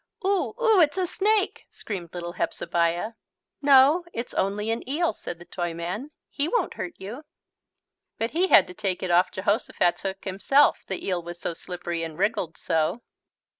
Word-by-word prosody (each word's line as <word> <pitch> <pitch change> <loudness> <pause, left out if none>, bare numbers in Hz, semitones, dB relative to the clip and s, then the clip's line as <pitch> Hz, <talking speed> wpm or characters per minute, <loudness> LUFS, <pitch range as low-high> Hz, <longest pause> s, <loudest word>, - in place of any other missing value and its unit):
"Oo, 390 -2 +1
oo, 445 -6 +5
it's 315 +3 +3
a 370 - +2
snake," 410 +3 0
screamed 180 -6 -6
little 175 0 -4
Hepzebiah. 170 +6 0 0.5
"No, 285 +4 +6
it's 235 +1 -5
only 210 +3 0
an 230 - -1
eel," 325 +4 +1
said 175 - -7
the 175 - -13
Toyman, 175 - -4 0.2
"he 285 - -2
won't 480 +8 0
hurt 345 - -5
you." 220 +10 -8 0.9
But 225 +1 -1
he 355 +5 +2
had 200 - +7
to 180 - -10
take 190 -3 -2
it 185 - -1
off 175 +2 +4
Jehosophat's 200 -2 0
hook 195 0 -4
himself, 205 +10 +3
the 190 - -4
eel 180 -2 0
was 170 0 -8
so 170 - -3
slippery 175 0 -5
and 160 -2 -5
wriggled 190 -4 0
so. 165 +9 0
200 Hz, 170 wpm, -26 LUFS, 175-290 Hz, 0.9 s, had